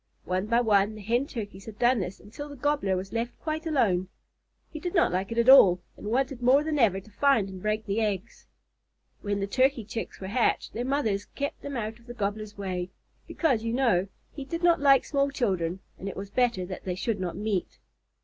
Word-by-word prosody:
One 185 +2 -1
by 235 +2 +3
one 210 -2 +3
the 215 - -9
Hen 240 +7 0
Turkeys 205 -6 -7
had 215 -2 -9
done 240 +1 +3
this 185 0 -4
until 290 +9 -9
the 285 - -9
Gobbler 285 -8 0
was 190 +1 -6
left 230 +1 -2
quite 315 0 -3
alone. 200 - +2 0.7
He 310 - -5
did 355 +4 -4
not 340 - +4
like 190 +4 -2
it 230 - -4
at 235 +1 +3
all, 195 -10 +8 0.2
and - - -9
wanted 255 +2 0
more 260 +4 +5
than 305 -1 -1
ever 200 -6 +3
to 215 +3 -17
find 265 -3 +3
and 190 -1 -9
break 215 +1 -1
the 205 +2 0
eggs. 210 0 -3 0.7
When 205 -1 -1
the - - +1
Turkey 255 +3 +1
Chicks 225 +1 -6
were 190 - -6
hatched, 230 +5 0
their 240 +2 -3
mothers 225 -8 0
kept 285 +2 -5
them 280 -2 -5
out 220 0 -4
of 235 - -22
the 240 - -8
Gobbler's 210 -1 -3
way, 185 -2 -3 0.4
because, 265 -10 +1
you 230 0 -1
know, 230 -8 +2 0.2
he 285 - -7
did 335 +5 -5
not 340 -2 +5
like 275 -2 +5
small 280 -1 +1
children 190 -9 -1 0.2
and 195 - -4
it - - -8
was 195 +1 -6
better 240 -7 +1
that 185 0 -7
they 180 -1 -3
should 205 +2 -2
not 180 -2 -3
meet. 205 -3 -2
225 Hz, 220 wpm, -27 LUFS, 195-270 Hz, 0.7 s, all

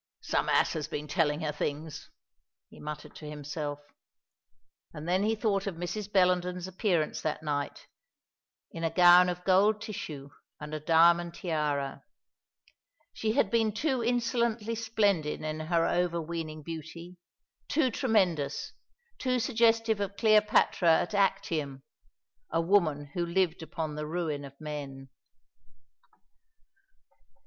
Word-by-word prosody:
"Some - - 0
ass - - +3
has 155 -2 -3
been 150 +1 -5
telling 150 -1 +1
her 155 -1 -1
things," 150 +1 -5 0.6
he - - -14
muttered 150 0 -7
to 150 - -8
himself. 150 0 -5 1.2
And 155 +1 -7
then 185 +2 +2
he 220 +2 +1
thought 205 -3 0
of 195 - -3
Mrs. 185 +5 -5
Bellenden's 180 -1 +2
appearance 180 -4 0
that 155 0 -3
night, 145 -2 -3 0.9
in 165 - -6
a 165 - +2
gown 180 +1 +7
of 180 0 -4
gold 200 +3 +4
tissue, 150 -10 -7 0.3
and 150 0 -8
a 155 - -2
diamond 170 +2 +4
tiara. 150 -5 -2 1.1
She 220 -1 -1
had - - +2
been 225 -2 +2
too 260 +1 0
insolently 235 -2 0
splendid 205 -10 0
in 155 0 -3
her 165 +1 +1
overweening 165 -3 -2
beauty, 165 +3 -8 0.5
too 275 -5 +2
tremendous, 190 - 0 0.5
too 255 -1 +1
suggestive 225 -3 +2
of 200 0 -3
Cleopatra 210 -6 +4
at 175 - -3
Actium, 160 -9 0 0.7
a 165 - 0
woman 165 -6 +1
who 175 - -1
lived 170 -1 0
upon 160 -1 -4
the 150 0 -5
ruin 155 -3 -3
of 140 0 -13
men. 140 -3 -7
170 Hz, 125 wpm, -29 LUFS, 150-205 Hz, 1.2 s, gown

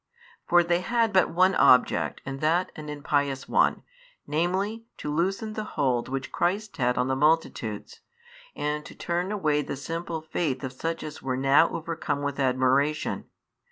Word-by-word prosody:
For 175 0 +5
they 175 0 +1
had 230 +1 +1
but 185 -2 +4
one 185 +3 +3
object 125 - +4
and 135 0 -5
that 165 +4 +1
an 150 -1 -8
impious 145 -2 -1
one, - - +2 0.4
namely, 190 +8 -1
to 150 - -4
loosen 195 +7 -1
the 215 - -3
hold 125 -4 +1
which 135 0 -4
Christ 200 +4 -1
had 125 -2 +1
on 125 - +1
the 130 - 0
multitudes, 140 -8 0 0.6
and 150 0 -2
to - - -11
turn 175 +3 -2
away 155 -8 +1
the 140 - -5
simple 165 +4 -4
faith 155 -3 -2
of 130 -1 -4
such 165 +5 -3
as 155 0 -7
were 130 -1 -2
now 135 +5 +4
overcome 155 -3 -3
with 140 0 -3
admiration. 135 +3 +1
150 Hz, 160 wpm, -26 LUFS, 135-175 Hz, 0.6 s, For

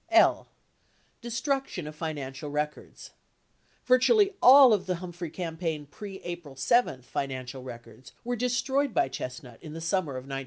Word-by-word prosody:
82 340 0 +7
L. - - +3 0.7
Destruction 240 - -2
or - - -5
Financial 150 -2 -5
Records 150 +1 -5 0.7
Virtually 395 - +4
all 260 -2 +9
of 190 -2 0
the 180 - 0
Humphrey 175 -1 -7
campaign 165 -2 -4
pre 195 -2 -8
April 175 -5 -7
7 135 - +2
financial 130 0 -5
records 120 -1 -11
were 245 +1 -2
destroyed 250 +3 0
by - - +3
Chestnut 125 -1 -7
in 155 - -9
the 165 - -6
summer 165 -3 -1
of 130 0 -6
1972. 135 0 -5
165 Hz, 150 wpm, -28 LUFS, -, 0.7 s, all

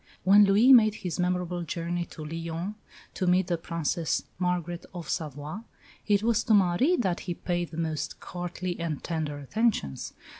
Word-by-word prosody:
When 205 +3 +7
Louis 215 +7 +6
made 215 -4 +6
his 180 -3 -4
memorable 180 0 0
journey 170 +1 -3
to 155 - -9
Lyons 165 +4 -4 0.4
to 185 - -2
meet 180 +1 +4
the 175 -1 -1
Princess 165 -1 -1 0.2
Margaret 175 -1 -1
of 170 -3 -6
Savoy, 150 +2 -4 0.5
it 205 -1 +3
was 230 -1 +2
to 220 - +5
Marie 200 - +3
that 190 - 0
he 175 -2 -4
paid 175 -1 -2
the 160 - -9
most 160 -3 -3
courtly 175 0 -5
and 165 -4 -3
tender 155 -3 -3
attentions. 145 - -1
175 Hz, 160 wpm, -28 LUFS, 165-195 Hz, 0.5 s, When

